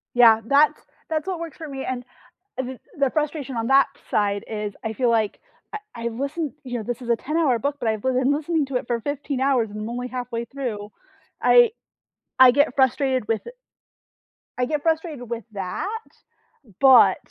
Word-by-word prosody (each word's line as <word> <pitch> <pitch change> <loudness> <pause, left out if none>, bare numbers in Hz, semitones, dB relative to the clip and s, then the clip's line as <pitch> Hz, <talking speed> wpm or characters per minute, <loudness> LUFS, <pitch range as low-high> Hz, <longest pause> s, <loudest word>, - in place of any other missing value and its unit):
Yeah, 230 -2 +7
that's 285 +3 +4 0.3
that's 315 0 -2
what 370 -3 -2
works 330 -4 -7
for 320 - -7
me, 270 -2 -6
and 255 -1 -3 0.5
uh, 260 - -1
th 255 0 -7 0.2
the 280 -1 +2
frustration 295 -4 -2
on 225 0 -1
that 270 +1 +5 0.2
side 205 -1 0
is 210 -2 -4
I 220 - -3
feel 245 +2 +1
like 220 -3 +1 0.3
I 430 - -3 0.2
I 235 0 -3
listen 280 +6 -3
you 245 -2 -4
know, 225 - -4
this 245 +4 -4
is 240 - -7
a 235 - +4
ten-hour 300 -4 +1
book, 285 +5 -1
but 235 -3 0
I've 220 -1 -1
be 260 - 0
lin 260 +2 +2
listening 310 +1 0
to 265 -2 -1
it 245 - -6
for 235 -1 -1
15 285 0 -3
hours 260 -5 +2
and 210 +1 -6
only 245 +1 -4
halfway 245 -2 -4
through. 230 -6 -5 0.5
I 485 -2 +6 0.7
I 260 -1 +9
get 285 +1 +2
frustrated 260 -3 +2
with 225 -1 -1
it 480 - -8 1.0
I 250 - +1
get 295 +2 -2
frustrated 315 -7 -1
with 235 -1 -4
that, 195 - -4 0.9
but 265 -2 +7
255 Hz, 190 wpm, -23 LUFS, 235-285 Hz, 1.0 s, I